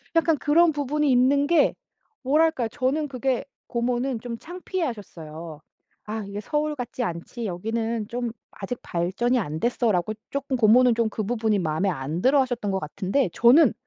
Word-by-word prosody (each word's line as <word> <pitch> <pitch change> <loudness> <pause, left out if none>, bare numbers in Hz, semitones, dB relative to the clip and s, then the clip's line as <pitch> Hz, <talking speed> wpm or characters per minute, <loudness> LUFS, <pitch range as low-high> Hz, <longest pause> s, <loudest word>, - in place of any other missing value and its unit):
약간 325 -2 +3
그런 320 +4 +4
부분이 290 0 0
있는 275 +3 +4
게 340 0 +3 0.5
뭐랄까요? 300 -3 +2
저는 290 +3 -1
그게 260 -1 -1 0.2
고모는 240 +1 -1
좀 235 0 -6
창피해하셨어요. 195 - -6 0.4
"아 215 0 -4
이게 200 +1 -5
서울 300 +6 -1
같지 250 -1 -4
않지. 195 +6 -5
여기는 225 +4 -2
좀 240 -1 -3 0.2
아직 220 +5 -6
발전이 195 +9 0
안 155 -6 -3
됐어."라고 215 -5 +1 0.2
쪼끔 280 -2 -2
고모는 240 +2 +5
좀 230 -1 +1
그 215 - -4
부분이 220 -2 0
마음에 160 +3 0
안 155 +1 -3
들어하셨던 255 -6 +2
것 190 - 0
같은데 190 - -1
저는 250 +4 +6
240 Hz, 335 characters per minute, -25 LUFS, 200-275 Hz, 0.5 s, 저는